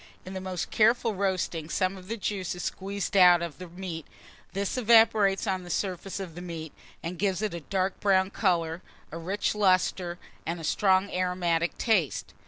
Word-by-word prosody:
In 185 - -7
the 190 - -4
most 185 -2 -4
careful 225 +1 +3
roasting, 185 -5 -1
some 185 +1 0
of 185 -1 -12
the 230 +3 -3
juice 195 -4 -3
is 175 - -6
squeezed 200 +1 -3
out 180 -2 +7
of 170 -1 -6
the 180 - -7
meat: 170 -2 -7 0.5
this 195 0 -2
evaporates 225 -4 +4
on 190 -3 -1
the 175 - -10
surface 190 +2 -3
of 185 -4 -6
the 175 - -8
meat, 165 -3 -7 0.3
and 170 +1 -5
gives 195 0 0
it 215 - -1
a 170 - -4
dark 190 +3 -2
brown 190 -1 +3
colour, 170 -5 0 0.3
a 165 - -6
rich 190 +5 -1
lustre, 185 -3 +2 0.3
and 170 +1 -3
a - - -8
strong 190 +4 +2
aromatic 180 -2 0
taste. 195 - 0
185 Hz, 185 wpm, -28 LUFS, 175-200 Hz, 0.5 s, out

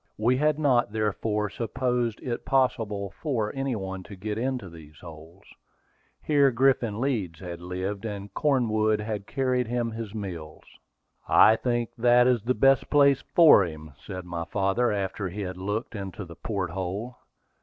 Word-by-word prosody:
We 120 +4 +2
had 150 +1 +2
not 130 -8 +2
therefore 105 -1 -1
supposed 120 0 -2
it 120 -2 -3
possible 110 -7 0
for 115 -9 -1
any 135 -2 -2
one 95 -2 -5
to 100 - -10
get 105 +3 -4
into 125 -2 -2
these 80 -3 -13
holds. 85 +2 -13 0.8
Here 145 -2 +4
Griffin 120 -4 +1
Leeds 105 - -2
had 85 -2 -7
lived, 95 +3 -4
and 105 -2 -6
Cornwood 110 -7 +1
had 105 -2 -4
carried 130 -3 0
him 120 -1 -1
his 110 -2 -6
meals. 85 -7 -7 0.7
"I 110 - +7
think 120 0 -1
that 120 +1 +5
is 125 -3 +3
the 125 +4 0
best 135 -2 +3
place 140 -2 +4
for 160 - +8
him," 80 -3 -7
said 90 -1 -7
my 85 -1 -4
father, 100 +7 +1
after 95 -1 -2
he 100 +4 -6
had 90 -2 -5
looked 105 +6 -3
into 100 -1 -6
the 85 -1 -11
port 95 -4 -3
hold. 95 +7 -4
110 Hz, 160 wpm, -26 LUFS, 95-125 Hz, 0.8 s, for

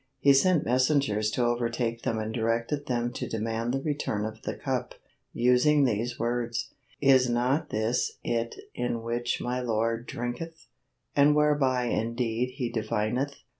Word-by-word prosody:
He 140 - +5
sent 165 +4 +3
messengers 125 -4 +2
to 120 +2 0
overtake 120 -1 -1
them 115 -4 -1
and 110 0 -3
directed 115 +5 -1
them 120 -1 -1
to - - -4
demand 115 +1 -2
the 135 +1 -1
return 140 -9 -1
of 110 0 -6
the - - -4
cup, - - -3 0.4
using 125 +5 +4
these 120 +1 -1
words: 120 +2 -2 0.3
"Is 130 -2 +5
not 130 +6 +1
this 110 +3 -1
it 115 -1 -1 0.2
in 120 -2 -2
which 120 +1 -1
my 125 +1 -2
lord 115 0 -1
drinketh, 125 +8 -5 0.5
and 145 +1 +5
whereby 145 -4 +3
indeed 120 +1 -1
he 125 -4 -2
divineth?" 115 +5 -1
120 Hz, 145 wpm, -28 LUFS, 115-135 Hz, 0.5 s, He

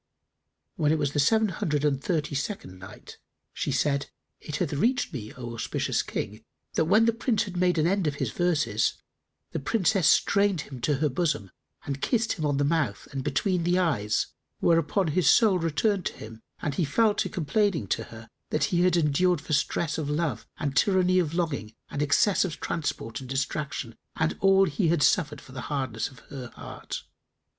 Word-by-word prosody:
When 150 -1 +2
it 160 - +3
was 145 -2 0
the 145 - -1
Seven 220 +9 +3
Hundred 150 -4 -1
and 140 -2 0
Thirty 155 -4 -1
second 140 - -4
Night, 95 - -12 0.3
She - - -2
said, 140 -1 0 0.3
It 150 - -6
hath 160 -2 -1
reached 230 - +1
me, 110 -5 -6
O 120 -2 -6
auspicious 115 - -1
King, 110 +2 -5 0.3
that 160 - +2
when 215 +7 +5
the 230 - +3
Prince 230 -2 0
had 190 -3 -8
made 180 -1 +2
an 155 - +3
end 190 -1 +1
of 145 - -1
his - - -2
verses, 155 -11 +1 0.6
the - - -2
Princess 190 - +2
strained 200 -4 +3
him 130 -4 -9
to 145 +5 +1
her 150 +3 +1
bosom 145 - -1 0.3
and 140 -1 -4
kissed 230 -2 +1
him 155 -4 -2
on 145 -1 0
the 145 - +2
mouth 145 -9 0
and 135 -1 -4
between 185 +2 0
the 175 +2 +2
eyes; 130 - +1 0.3
whereupon 165 +2 +2
his 155 -1 +3
soul 205 -3 +5
returned 175 +4 0
to - - -5
him 110 +1 -10 0.2
and 145 - -1
he 170 - 0
fell 210 +9 +3
to - - -1
complaining 185 +2 0
to - - -1
her 115 0 -11
of 110 - -19 0.2
that - - 0
he 175 -3 +2
had 180 -1 +4
endured 170 +2 +2
for 150 - -5
stress 155 +2 0
of 145 -2 -3
love 150 -5 -1
and 145 -3 -2
tyranny 185 +3 +3
of 165 -2 -1
longing 140 -11 -2 0.2
and 145 - -2
excess 150 +7 +3
of 170 -5 -4
transport 115 -8 -3
and 130 -2 -10
distraction 135 -2 -3 0.2
and 160 0 0
all 195 0 +5
he 175 +2 0
had 165 -2 +2
suffered 150 -5 +2
for 130 - -15
the 130 0 -6
hardness 130 -6 -2
of 130 - -17
her 130 -3 -6
heart. - - -7
155 Hz, 195 wpm, -27 LUFS, 140-180 Hz, 0.6 s, when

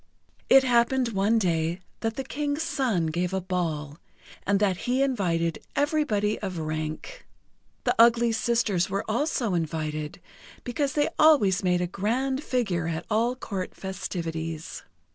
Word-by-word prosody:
It 270 0 +8
happened 245 0 +3
one 205 +2 +2
day 170 -3 0 0.2
that 225 -1 -2
the 270 - -3
King's 290 +3 -2
son 260 - 0
gave 175 +4 -1
a - - +1
ball, 165 -5 -3 0.5
and 200 0 +3
that 200 -3 +2
he 260 +2 +3
invited 170 - 0 0.2
everybody 280 -8 +1
of 190 -4 -4
rank. 155 - -5 0.6
The - - +2
ugly 235 0 +6
sisters 220 -5 +1
were 195 +1 -2
also 235 - 0
invited, 155 -2 -3 0.4
because 270 +3 -1
they 295 +1 +2
always 235 - +5
made 180 -1 +2
a - - +1
grand 250 - -1
figure 195 - -1
at 160 -1 -3
all 230 +4 +2
Court 195 -7 -5
festivities. 165 -4 -5
200 Hz, 140 wpm, -26 LUFS, 170-250 Hz, 0.6 s, It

